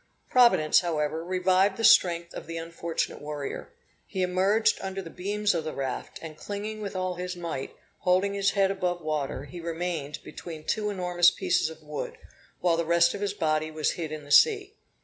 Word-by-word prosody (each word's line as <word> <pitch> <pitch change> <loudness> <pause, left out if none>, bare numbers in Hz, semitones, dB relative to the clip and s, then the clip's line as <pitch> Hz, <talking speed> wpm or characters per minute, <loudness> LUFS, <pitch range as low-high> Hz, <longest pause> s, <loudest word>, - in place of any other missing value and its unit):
Providence, 235 -11 +5
however, 160 -2 -1
revived 185 +2 +2
the 225 - -4
strength 170 -6 +5
of - - -8
the 165 0 -5
unfortunate 165 0 -3
warrior. 145 -1 -5 0.4
He 185 - -2
emerged 190 +5 +2
under 195 0 -4
the 170 -4 -7
beams 205 +2 0
of 165 -2 -1
the 155 - -5
raft, 135 -2 -4
and 160 -1 -7
clinging 210 +5 -5
with 200 -2 -5
all 185 -1 -2
his 180 0 -4
might, 165 -6 -5 0.2
holding 185 +2 +2
his 200 -1 +2
head 195 -1 +4
above 180 -2 -2
water, 150 -3 -2
he 175 +3 -9
remained 165 -3 -3
between 160 -3 -9
two 210 +5 -1
enormous 180 -3 +4
pieces - - 0
of 160 - -12
wood, 150 -1 -5 0.4
while 170 -2 +3
the 170 - +1
rest 170 +1 +4
of 200 - -6
his 205 - -1
body 155 0 0
was 155 -1 0
hid 160 -3 -5
in 155 -1 -6
the 145 - -12
sea. 410 - +5
175 Hz, 190 wpm, -27 LUFS, 155-195 Hz, 0.4 s, Providence